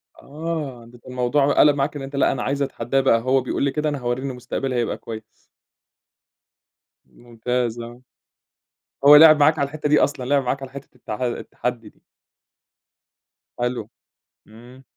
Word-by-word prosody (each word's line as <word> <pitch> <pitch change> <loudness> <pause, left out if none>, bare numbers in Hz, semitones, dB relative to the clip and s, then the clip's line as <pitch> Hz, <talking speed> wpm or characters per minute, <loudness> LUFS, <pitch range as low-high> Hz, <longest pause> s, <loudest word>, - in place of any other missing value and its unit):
آه، 150 -5 -6
ده 120 +1 -16
كان 120 - -13
الموضوع 130 +3 +1
قلَب 150 -1 +5
معاك 145 +1 -1
إن 140 - -5
أنت 135 +1 -7
لأ 140 - +2
أنا - - -3
عايز 140 +1 -2
أتحدّاه 135 -1 -1
بقى، 115 -4 +3
هو 130 +2 +2
بيقول 125 - -3
لي 140 - +1
كده 150 0 -1
أنا 145 - -3
هورّيه 120 +2 -3
إن - - -3
مستقبلي 125 +1 -4
هيبقى 120 -2 -1
كويس. 110 -1 -8 1.8
ممتاز، 120 0 -4
آه. 120 +1 -9 1.0
هو 145 +1 +10
لعِب 155 0 +8
معاك 155 +2 +4
على 140 - +2
الحِتّة 150 0 -4
دي 150 - +5
أصلًا، 140 -3 0
لعب 140 +1 +2
معاك 135 +2 -2
على 135 -1 -8
حِتّة 140 -1 -11
التح 110 -2 -7
التحدي 120 -1 -4
دي. - - -30 1.6
حلو، 120 0 -3 0.6
إمم. 120 +4 -16
130 Hz, 165 wpm, -22 LUFS, 120-145 Hz, 1.8 s, هو